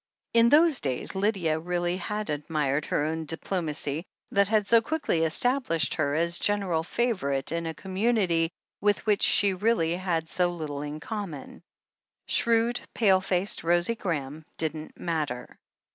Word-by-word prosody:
In 230 0 +5
those 310 +1 +5
days, 130 -3 -2
Lydia 190 -4 0
had 165 - -13
really 175 +1 -1
admired 150 -7 -1
her 145 - 0
own 160 +1 -3
diplomacy, 160 -2 -3 0.3
that 200 -1 +3
had 215 -1 +2
so 230 +3 +5
quickly 300 - -1
established 165 - +2
her 145 -2 0
as 170 +2 0
gen 205 0 +2
eral 170 -4 -1
favourite 165 - -1
in 165 0 -2
a 160 - -4
community 190 -4 0 0.3
with 205 0 +1
which 210 -2 +2
she 200 -1 +5
really 185 -4 +1
had 170 -3 -1
so 175 +2 +1
little 155 -5 -5
in 150 +1 -5
common. 190 - -6 0.6
Shrewd, 235 +1 +2
pale 190 -4 +4
faced 190 0 -1
Rosie 175 +5 +2
Graham 155 -8 -4
didn't 155 -1 -3
matter. 150 -8 -3
175 Hz, 145 wpm, -27 LUFS, 155-205 Hz, 0.6 s, In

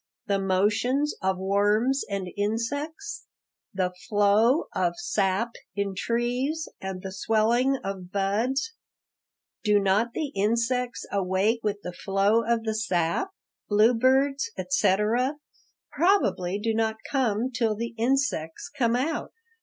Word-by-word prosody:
The 200 -1 +1
motions 210 +10 +1
of 190 -1 0
worms 205 +7 +2
and 195 -2 -3
insects? 285 - -3 0.4
The 185 -1 -1 0.2
flow 215 +6 +4
of 175 -2 +1
sap 220 - 0 0.2
in 200 -1 -1
trees 245 - -1
and 190 -1 -5
the 190 - -5
swelling 225 +7 +2
of 190 -2 -5
buds? 225 - 0 0.9
Do 210 -2 +4
not 200 +4 +1
the 305 -3 -2
insects 235 +2 0
awake 195 +4 +1
with 205 -1 -2
the 180 - -5
flow 195 +5 +2
of 230 0 0
the 220 -1 -1
sap? 185 - 0 0.4
Bluebirds, 260 - +3
etc., 235 +3 +1 0.6
probably 305 - +2
do 225 +2 -1
not 220 0 0
come 250 -3 0
till 230 -3 0
the 235 +2 -4
insects 235 - -1
come 240 -4 +2
out. 290 +6 -2
220 Hz, 120 wpm, -26 LUFS, 195-255 Hz, 0.9 s, flow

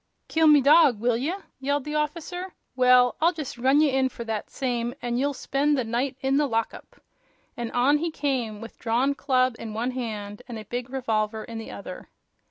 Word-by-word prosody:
"Kill 320 0 +3
me 300 -2 +7
dog, 285 -4 +6
will 240 +1 +2
ye 260 +7 -1
eh?" 380 +3 -3 0.2
yelled 285 +1 -1
the 300 - -5
officer; 335 +5 -3 0.2
"well, 250 -1 +5
I'll 335 +2 +4
just 300 -6 -6
run 265 +4 +4
ye 300 -2 +3
in 265 0 +2
for 235 - -7
that 220 -2 -4
same, 245 -2 -2
an' 240 -1 -3
ye'll 280 +2 0
spend 285 +3 0
the 255 - +1
night 245 +4 -2
in 270 +1 +1
the 295 0 +2
lockup!" 230 -2 -4 0.6
And 235 -1 -4
on 275 +5 +3
he 335 +2 -1
came, 255 -9 -2
with 230 - -10
drawn 245 +4 +1
club 255 -3 +1
in 220 -2 -6
one 240 +3 -1
hand 215 -4 -5
and 240 -3 -6
a 215 - -8
big 245 +4 -5
revolver 220 -4 -1
in 230 -1 -7
the 225 - -8
other. 190 -2 -9
255 Hz, 205 wpm, -25 LUFS, 230-285 Hz, 0.6 s, me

